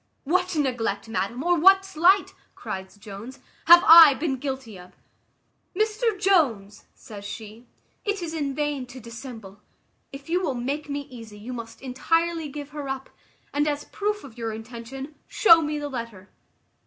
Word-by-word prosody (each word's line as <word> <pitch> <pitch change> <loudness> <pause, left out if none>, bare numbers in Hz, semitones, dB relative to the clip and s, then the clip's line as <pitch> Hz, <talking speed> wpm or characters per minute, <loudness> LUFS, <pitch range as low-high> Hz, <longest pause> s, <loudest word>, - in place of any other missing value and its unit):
"What 365 +4 0
neglect, 245 -8 -1
madam, 230 +4 -3
or 350 0 +2
what 385 +3 +6
slight," 380 +2 +3 0.2
cries 190 +1 -7
Jones, 210 +5 -10 0.3
"have 345 +1 +9
I 325 -4 +10
been 270 -1 -2
guilty 265 -5 -5
of?" 180 0 -15 0.8
"Mr 435 +1 0
Jones," 260 - +1
said 210 -5 -11
she, 220 +3 -9 0.4
"it 410 -1 -1
is 325 -1 -5
in 285 -4 -3
vain 295 -3 -2
to 255 +1 -11
dissemble; 230 -4 -10 0.5
if 275 0 -11
you 350 +3 0
will 280 -8 -2
make 280 +5 -4
me 285 0 -3
easy, 230 -6 -12
you 230 +5 -8
must 230 +1 -9
entirely 330 +5 0
give 290 0 -8
her 295 -2 -7
up; 270 0 -5 0.4
and 295 +1 +1
as 290 -1 -1
a - - -21
proof 415 0 -2
of 240 -3 -13
your 225 -1 -3
intention, 235 +6 -8
show 335 -6 +6
me 300 -1 -2
the 295 0 -4
letter." 230 -8 -7
275 Hz, 165 wpm, -25 LUFS, 230-330 Hz, 0.8 s, I